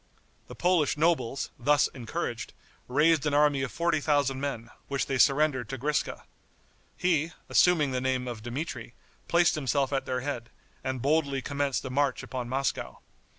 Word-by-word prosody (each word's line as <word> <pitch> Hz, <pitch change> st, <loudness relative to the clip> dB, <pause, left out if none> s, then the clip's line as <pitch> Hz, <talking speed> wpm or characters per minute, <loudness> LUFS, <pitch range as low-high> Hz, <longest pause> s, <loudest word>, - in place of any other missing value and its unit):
The -, -, -10 dB
Polish 175 Hz, -4 st, +2 dB
nobles, 150 Hz, -5 st, +1 dB
thus 145 Hz, +3 st, +4 dB
encouraged, 120 Hz, -4 st, -5 dB, 0.3 s
raised 150 Hz, +3 st, +3 dB
an 145 Hz, -, +1 dB
army 145 Hz, -2 st, +4 dB
of 135 Hz, -, -3 dB
forty 170 Hz, -2 st, +1 dB
thousand 140 Hz, -3 st, +1 dB
men, 120 Hz, -5 st, -4 dB, 0.2 s
which 140 Hz, -1 st, -1 dB
they 135 Hz, -1 st, -2 dB
surrendered 140 Hz, -3 st, +3 dB
to 135 Hz, -, -4 dB
Griska. 145 Hz, +4 st, -1 dB, 0.7 s
He, 165 Hz, -2 st, +1 dB, 0.2 s
assuming 160 Hz, -6 st, +4 dB
the 125 Hz, -1 st, -1 dB
name 130 Hz, -1 st, -1 dB
of 120 Hz, -3 st, -5 dB
Dmitri, 120 Hz, -1 st, -5 dB, 0.3 s
placed 170 Hz, 0 st, +4 dB
himself 140 Hz, -1 st, 0 dB
at 135 Hz, -1 st, -1 dB
their 125 Hz, 0 st, -1 dB
head, 125 Hz, -4 st, -4 dB, 0.3 s
and 130 Hz, -2 st, -3 dB
boldly 140 Hz, -2 st, +1 dB
commenced 140 Hz, -2 st, -1 dB
a 130 Hz, -, -4 dB
march 140 Hz, 0 st, 0 dB
upon 125 Hz, -2 st, -5 dB
Moscow. 135 Hz, 0 st, -2 dB
140 Hz, 155 wpm, -28 LUFS, 130-150 Hz, 0.7 s, thus